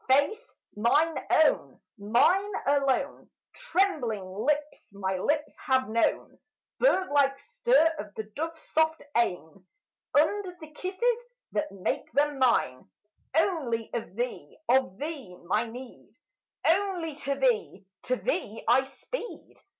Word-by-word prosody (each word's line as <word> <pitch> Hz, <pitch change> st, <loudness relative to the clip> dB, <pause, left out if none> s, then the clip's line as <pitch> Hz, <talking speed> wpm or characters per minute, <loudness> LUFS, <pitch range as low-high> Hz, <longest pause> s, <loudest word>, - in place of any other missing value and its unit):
"Face, 290 Hz, -, +2 dB, 0.2 s
mine 295 Hz, +10 st, +2 dB
own, 315 Hz, -2 st, +3 dB, 0.2 s
mine 300 Hz, -, +3 dB
alone, 275 Hz, -2 st, +1 dB, 0.2 s
Trembling 335 Hz, -, 0 dB
lips 290 Hz, +8 st, -2 dB
my 190 Hz, -1 st, -2 dB
lips 300 Hz, +8 st, 0 dB
have 260 Hz, -1 st, +1 dB
known, 230 Hz, +1 st, 0 dB, 0.4 s
Birdlike 285 Hz, -, +3 dB
stir 485 Hz, -, +2 dB
of 210 Hz, -, -6 dB
the 220 Hz, -, -3 dB
dove 325 Hz, +2 st, -3 dB
soft 320 Hz, 0 st, 0 dB
eyne 185 Hz, -5 st, -1 dB, 0.5 s
Under 360 Hz, +5 st, +2 dB
the 315 Hz, -2 st, -11 dB
kisses 425 Hz, +9 st, -1 dB, 0.3 s
that 300 Hz, -, -1 dB
make 195 Hz, -2 st, -3 dB
them 290 Hz, +1 st, +1 dB
mine! 180 Hz, -, +2 dB, 0.5 s
Only 280 Hz, -, 0 dB
of 225 Hz, -5 st, -4 dB
thee, 245 Hz, +2 st, -4 dB
of 250 Hz, -7 st, +2 dB
thee, 280 Hz, -, -6 dB
my 210 Hz, +7 st, 0 dB
need! 245 Hz, +2 st, -10 dB, 0.6 s
Only 355 Hz, -2 st, +1 dB
to 280 Hz, -2 st, -2 dB
thee, 240 Hz, -7 st, 0 dB, 0.2 s
to 255 Hz, -, +1 dB
thee, 225 Hz, -, -3 dB
I 260 Hz, -, +6 dB
speed!" 455 Hz, -, -8 dB
280 Hz, 120 wpm, -28 LUFS, 230-330 Hz, 0.6 s, I